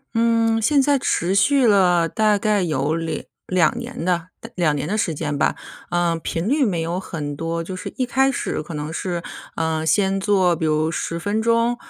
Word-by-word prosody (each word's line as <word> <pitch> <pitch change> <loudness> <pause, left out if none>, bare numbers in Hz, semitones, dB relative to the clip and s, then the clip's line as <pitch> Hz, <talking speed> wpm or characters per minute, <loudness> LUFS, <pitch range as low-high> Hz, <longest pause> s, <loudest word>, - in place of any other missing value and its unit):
嗯， 230 -1 +2
现 285 +5 +3
在 280 0 +3
持 180 -4 0
续 260 +6 +4
了 180 -5 +4
大 215 0 +2
概 210 -1 +1
有 155 -2 0
2 165 -1 -3 0.2
2 180 +1 +2
年 240 -7 -6
的 175 -1 0 0.3
2 165 -4 +1
年 145 +1 -3
的 210 - -1
时 170 -7 0
间 145 -1 -3
吧。 150 - +1 0.3
呃， 175 -1 +1
频 165 +3 -3
率 285 +3 +2
没 185 -8 0
有 170 +3 -2
很 145 -6 -5
多， 165 +2 -3
就 185 +2 -6
是 185 - -6
一 255 - +1
开 265 +2 +2
始 - - -3
可 155 +1 -8
能 150 +2 -4
是， 175 -1 -3 0.3
呃， 160 -1 -1
先 190 +4 +2
做 190 -3 +2
比 160 0 -2
如 155 +1 +1
10 170 0 -3
分 205 +5 -1
钟， 230 +1 +2
180 Hz, 190 characters per minute, -21 LUFS, 165-220 Hz, 0.3 s, 续